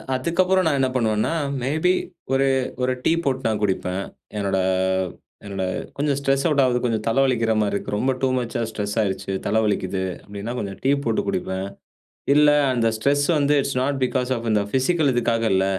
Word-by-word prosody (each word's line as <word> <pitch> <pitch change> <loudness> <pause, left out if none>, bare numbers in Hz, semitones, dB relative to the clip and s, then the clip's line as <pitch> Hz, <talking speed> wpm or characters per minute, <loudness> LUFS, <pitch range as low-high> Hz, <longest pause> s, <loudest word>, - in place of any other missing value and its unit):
அதுக்கப்புறம் 180 +7 +2
நான் 145 -3 +2
என்ன 130 -1 +2
பண்ணுவேன்னா, 110 +2 +1 0.3
மே 130 - -1 0.2
பி 180 - +5 0.4
ஒரு, 135 +1 +3 0.3
ஒரு 130 0 +1
டீ - - +3
போட்டு 130 -2 0
நான் 110 -1 -1
குடிப்பேன். 95 -1 -2 0.3
என்னோட 100 -1 0 0.9
என்னோட 95 -2 -3 0.3
கொஞ்சம் 140 -1 0
ஸ்ட்ரெஸ் 135 0 +1
அவுட் 150 -3 +3
ஆகுது, 125 -1 +2
கொஞ்சம் 110 -3 0
தலை 115 +4 +1
வலிக்கிற 120 -4 +1
மாரி 105 -1 0
இருக்கு. 100 - -3
ரொம்ப 130 +6 +1
டூ 135 - +3
மச்சா 120 0 -2
ஸ்ட்ரெஸ் 105 -2 -4
ஆயிருச்சு, 95 -1 -2
தலை 110 +2 +2
வலிக்குது 95 -3 -1 0.2
அப்படின்னா 100 +3 -6
கொஞ்சம் 100 -4 -4
டீ 135 - +2
போட்டு 115 -3 0
குடிப்பேன். 95 +1 -2 0.7
இல்ல 150 +1 +6 0.2
அந்த 115 -2 +1
ஸ்ட்ரெஸ் 140 +5 +2
வந்து 145 0 +2
இட்ஸ் 135 -1 -3
நோட் 140 +1 0
பிக்காஸ் 130 0 -1
ஆஃப் 115 -1 -5
இந்த 105 -1 +3
பிசிக்கல் 145 +3 +2
இதுக்காக 115 -1 +1
இல்ல, 95 0 +3
120 Hz, 180 wpm, -23 LUFS, 105-135 Hz, 0.9 s, இல்ல